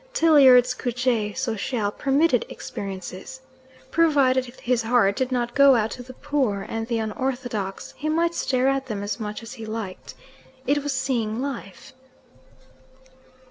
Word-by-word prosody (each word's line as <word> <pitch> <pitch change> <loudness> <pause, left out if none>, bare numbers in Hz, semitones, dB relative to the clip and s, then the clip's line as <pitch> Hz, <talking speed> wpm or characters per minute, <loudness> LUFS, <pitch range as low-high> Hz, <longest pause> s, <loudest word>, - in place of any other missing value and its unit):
Tilliard's 265 - +6
couche 245 -4 -1
sociale 230 -3 -1
permitted 275 +1 +2
experiences. 195 +5 -7 0.5
Provided 280 -6 +3
his 245 -1 -1
heart 225 -3 +3
did 260 +2 -1
not 240 -1 -1
go 280 -1 +6
out 225 -1 0
to 250 - -7
the 255 +1 -11
poor 260 -10 -1
and 225 0 -4
the 235 -1 -1
unorthodox, 225 -3 -3
he 305 +3 -3
might 335 +2 +1
stare 260 -5 0
at 270 0 0
them 205 -4 -4
as 205 +4 -3
much 210 +1 -5
as 230 +2 -8
he 225 -4 -8
liked. 215 -4 -6 0.5
It 290 +2 +2
was 290 +1 -3
seeing 230 -4 -1
life. 255 -8 -6
250 Hz, 140 wpm, -24 LUFS, 220-270 Hz, 0.5 s, Tilliard's